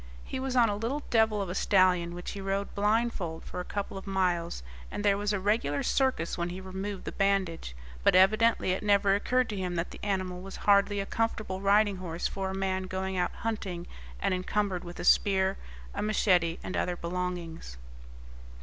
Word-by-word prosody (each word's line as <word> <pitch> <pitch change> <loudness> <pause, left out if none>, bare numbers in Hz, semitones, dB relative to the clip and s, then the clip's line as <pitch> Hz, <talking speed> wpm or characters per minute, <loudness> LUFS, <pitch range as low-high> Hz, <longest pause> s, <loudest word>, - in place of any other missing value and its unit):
He 265 - -5
was 260 -1 -2
on 240 -2 +6
a 205 - 0
little 245 +8 -2
devil 220 -3 +3
of 190 - -6
a - - -2
stallion, 185 -3 +3
which 175 - -5
he 200 - -6
rode 195 +1 -2
blindfold 205 -5 0
for - - -6
a - - -2
couple 200 0 -4
of 190 - -13
miles, 175 - 0 0.3
and 205 - -4
there 200 -1 +5
was 205 +1 -1
a 205 - 0
regular 190 -8 +1
circus 260 - 0
when 170 0 -1
he 180 +2 -6
removed 190 +1 -5
the - - -3
bandage; 190 - 0 0.3
but - - +5
evidently 215 +2 +4
it 185 - -1
never 200 -1 +3
occurred 250 +5 +2
to 210 - -3
him 180 -2 -2
that 170 +1 -2
the - - -10
animal 185 -3 -2
was 195 +1 -8
hardly 205 0 +4
a 195 - -1
comfortable 215 -4 -2
riding 200 0 +4
horse 175 -2 -5
for 195 -1 -3
a 190 - -4
man 190 -1 -1
going 190 +1 -3
out 180 - 0
hunting 190 -6 -3 0.3
and - - +1
encumbered 185 0 -1
with 175 0 -9
a - - -3
spear, 190 -1 +4 0.4
a - - -3
machete, 180 -6 +2
and 185 - -4
other 180 - 0
belongings. 170 - -4
195 Hz, 195 wpm, -29 LUFS, 180-205 Hz, 0.4 s, on